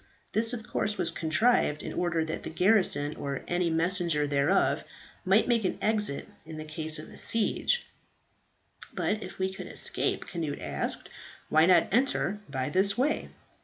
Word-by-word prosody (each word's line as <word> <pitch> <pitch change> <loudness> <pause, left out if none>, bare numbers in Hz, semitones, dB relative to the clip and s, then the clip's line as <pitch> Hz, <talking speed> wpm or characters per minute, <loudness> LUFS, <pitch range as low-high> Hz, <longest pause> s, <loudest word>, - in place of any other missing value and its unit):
This 225 +1 +1
of 230 -3 -6
course 210 0 -1
was - - 0
contrived 160 -2 +2
in - - -5
order 170 -2 0
that 160 - -4
the - - -6
garrison, 180 -5 +3
or 140 -1 -4
any 175 -1 +1
messenger 165 -2 +1
thereof, 140 -1 +2 0.4
might 195 +4 +4
make 235 -3 +2
an 185 - -1
exit 210 -9 0 0.2
in 160 0 -9
case 155 0 0
of 155 - -10
siege." 230 - +1 1.1
"But 215 +1 -1
if 185 - -8
we 190 0 -1
could - - -7
escape," - - -1
Cnut 160 -5 -3
asked, - - -3 0.4
"why 155 +2 +5
not 180 -3 +5
enter 225 -4 +1
by 130 +2 -2
this 195 +5 +2
way?" 285 +5 0
180 Hz, 155 wpm, -28 LUFS, 155-210 Hz, 1.1 s, why